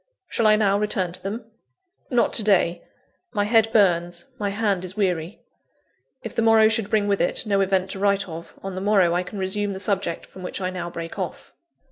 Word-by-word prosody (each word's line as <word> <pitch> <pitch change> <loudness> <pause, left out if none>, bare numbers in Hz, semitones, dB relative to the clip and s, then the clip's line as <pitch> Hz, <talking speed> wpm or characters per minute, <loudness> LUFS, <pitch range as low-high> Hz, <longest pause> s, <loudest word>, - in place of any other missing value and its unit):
Shall 230 - +1
I 215 - +6
now 200 -2 +2
return 200 -4 0
to - - -8
them? 215 +4 -5 0.6
Not 240 -3 +2
to 225 - +4
day; 175 -4 +2 0.5
my 205 -2 +1
head 225 +1 +3
burns, 175 -5 +2
my 205 -1 -1
hand 200 -3 0
is 185 +2 -6
weary. 180 -2 -1 0.8
If 225 - -6
the - - 0
morrow 225 -1 +5
should 220 -2 0
bring 210 -2 +1
with 200 -1 +1
it 175 - +1
no 200 -2 +2
event 190 -1 +1
to 195 - -6
write 200 0 +1
of, 165 0 -9
on 195 0 -5
the 185 - -5
morrow 195 -4 +3
I 175 - +1
can 180 +3 -8
resume 200 +2 -1
the 190 - -6
subject 195 -3 -1
from 190 - -13
which 180 - -5
I 185 -1 -2
now 175 -2 -5
break 165 -1 -7
off. - - -6
195 Hz, 210 wpm, -23 LUFS, 185-210 Hz, 0.8 s, I